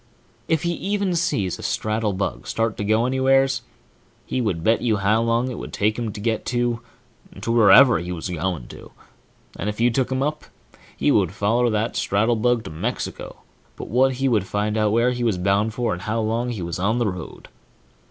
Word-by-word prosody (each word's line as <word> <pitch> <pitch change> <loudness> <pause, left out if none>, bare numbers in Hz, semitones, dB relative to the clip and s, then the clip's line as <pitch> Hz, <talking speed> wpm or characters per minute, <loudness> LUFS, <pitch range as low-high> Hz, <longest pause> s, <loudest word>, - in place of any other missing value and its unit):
If 160 -2 +1
he 170 - 0
even 200 +1 -1
seen 150 - 0
a - - -6
straddlebug 105 -3 -2
start 115 -1 -1
to - - -3
go 110 +3 +2
anywheres, 135 +1 +2 0.6
he 130 - -2
would 95 -8 -2
bet 115 +5 +3
you 110 -3 +1
how 105 +3 +2
long 115 +2 +1
it 120 - -6
would - - -7
take 105 +1 0
him 115 -3 -2
to 100 - -8
get 110 +3 -2 0.9
wherever 115 - +6
he 90 +2 -5
was 85 0 -4
going 85 -6 -3
to, - - -11 0.7
and 105 - -2
if 105 - -6
you 120 +1 +3
took 125 +2 0
him 130 +1 0
up, 150 +1 -3 0.5
he - - +2
would - - +2
foller 120 +4 +1
that 110 +1 -1
straddlebug 115 +3 +1
to - - -8
Mexico 80 - -5 0.3
but - - -8
what 130 +4 +3
he 135 +2 -1
would 105 -7 +1
find 105 +2 -1
out 110 -1 +2
where 115 +3 +3
he 120 -1 -3
was 110 -6 +1
bound 100 +4 +1
for 120 -3 0
and 90 - -6
how 110 +3 -2
long 115 +3 -1
he 110 -7 -4
was 85 +1 -4
on 105 +5 +1
the 120 - +1
road. 90 -4 -7
115 Hz, 195 wpm, -22 LUFS, 100-125 Hz, 0.9 s, wherever